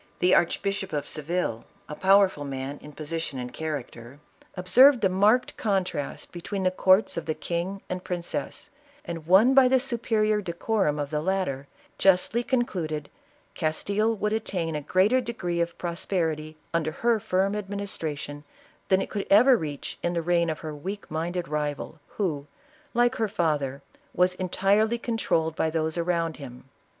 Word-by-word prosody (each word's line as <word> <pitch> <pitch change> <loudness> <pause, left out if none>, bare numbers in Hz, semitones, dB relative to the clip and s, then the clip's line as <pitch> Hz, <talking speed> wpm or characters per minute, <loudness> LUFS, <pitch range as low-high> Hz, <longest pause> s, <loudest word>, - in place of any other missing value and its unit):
The 180 +1 +3
Archbishop 195 +2 +1
of 145 -1 -1
Seville, 155 -7 -2 0.2
a - - -6
powerful 190 -2 +4
man 140 0 -5
in 150 - -11
position 155 -1 -4
and 125 -1 -6
character, 140 -5 -6 0.4
observing 240 +9 +6
the 195 - +3
marked 210 +7 +3
con 195 -3 +1
trast 145 -5 -6
between 190 +3 -4
the 185 - +3
courts 190 +1 +3
of 165 - -4
the 155 - -1
king 180 +3 -3
and 180 0 -4
princess, 180 +11 -4 0.3
and 165 -2 -6
won 205 +9 +6
by 265 -1 +7
the 260 +1 +4
superior 220 -4 +1
decorum 175 -3 0
of 145 0 -3
the 150 -1 -1
latter, 155 -7 -1 0.3
justly 195 +5 +3
con 245 0 +1
cluded, 155 -9 -4 0.4
Castile 200 +7 0
would 210 +1 -1
attain 175 -7 -2
a 150 - -2
greater 190 - +3
degree 175 -8 -2
of 170 0 -2
pros 170 -1 -4
perity 155 -4 -2 0.2
under 160 -2 0
her 230 +6 +1
firm 195 0 0
administration, 190 -8 -4 0.4
than 190 0 +3
it - - -8
could 205 -2 -3
ever 250 +6 +7
reach 150 -9 -5
in 175 - -1
the 170 -1 -1
reign 170 0 +2
of 155 - -4
her 155 -1 -5
weak 190 +7 -7
minded 170 +2 -2
rival, 150 +1 -3 0.2
who, 150 -8 -1 0.5
like 240 +2 +3
her 225 - +1
father, 145 -7 -1 0.3
was 180 +1 +3
entirely 200 +5 +1
controlled 165 -9 -1
by 160 - +1
those 160 0 -1
around 170 -1 -1
him. 125 -2 -10
175 Hz, 160 wpm, -26 LUFS, 155-200 Hz, 0.5 s, by